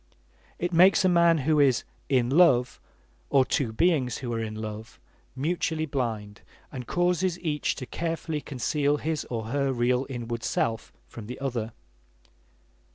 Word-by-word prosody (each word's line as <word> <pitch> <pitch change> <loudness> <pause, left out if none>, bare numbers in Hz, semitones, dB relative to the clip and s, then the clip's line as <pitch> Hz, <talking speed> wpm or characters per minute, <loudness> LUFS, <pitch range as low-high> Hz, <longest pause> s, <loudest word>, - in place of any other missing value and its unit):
It 175 +1 -2
makes 185 +3 +6
a - - +6
man 170 -2 +4
who 155 -1 +3
is 135 -4 +3 0.3
"in 125 -3 +2
love," 135 -6 +4 0.5
or 135 -2 +4
two 130 -4 0
beings 135 -1 +1
who 120 -3 -4
are 115 - -2
in 110 -1 -4
love, 110 +1 -7 0.4
mutually 160 +2 -1
blind, 110 -8 -4 0.3
and 125 -4 -7
causes 175 0 +1
each 155 -4 -1
to 130 - -6
carefully 165 +1 -3
conceal 145 +2 0
his 155 0 -2
or 115 -2 -5
her 140 +1 0
real 125 +1 +1
inward 120 -2 -5
self 115 -1 -1
from 110 -3 -10
the 125 - -7
other. 120 -5 -3
135 Hz, 150 wpm, -27 LUFS, 120-160 Hz, 0.5 s, makes